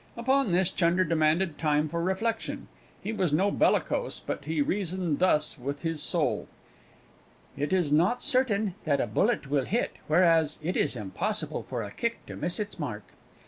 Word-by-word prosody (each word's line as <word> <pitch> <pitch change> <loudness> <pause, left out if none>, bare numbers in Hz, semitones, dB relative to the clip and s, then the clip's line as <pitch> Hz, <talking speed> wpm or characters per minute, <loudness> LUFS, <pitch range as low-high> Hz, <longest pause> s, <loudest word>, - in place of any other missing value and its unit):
Upon 260 -1 +2
this 180 +1 +2
Chunder 175 +1 +2
demanded 165 0 +1
time 150 -1 +2
for 170 +2 -3
reflection; 220 +6 -2 0.4
he 215 - -3
was 185 -7 0
no 190 +7 +2
bellicose, - - +1
but 140 - -5
he 160 0 -2
reasoned 180 -1 0
thus 155 -5 +2
with 140 +4 -5
his 165 -2 -1
soul: - - 0 1.1
"It 145 +1 -2
is 180 -6 +1
not 175 +11 +3
certain 220 -8 +2
that 145 -3 +2
a - - +1
bullet 210 -8 0
will 140 -3 +2
hit 235 - -1
whereas, 160 -2 +3
it 180 +4 -1
is 140 - +1
impossible 105 -5 -3
for - - -4
a 100 - -7
kick 230 - -3
to - - -8
miss 175 +5 -1
its 205 -3 -5
mark." 110 -9 -5
170 Hz, 170 wpm, -28 LUFS, 150-200 Hz, 1.1 s, not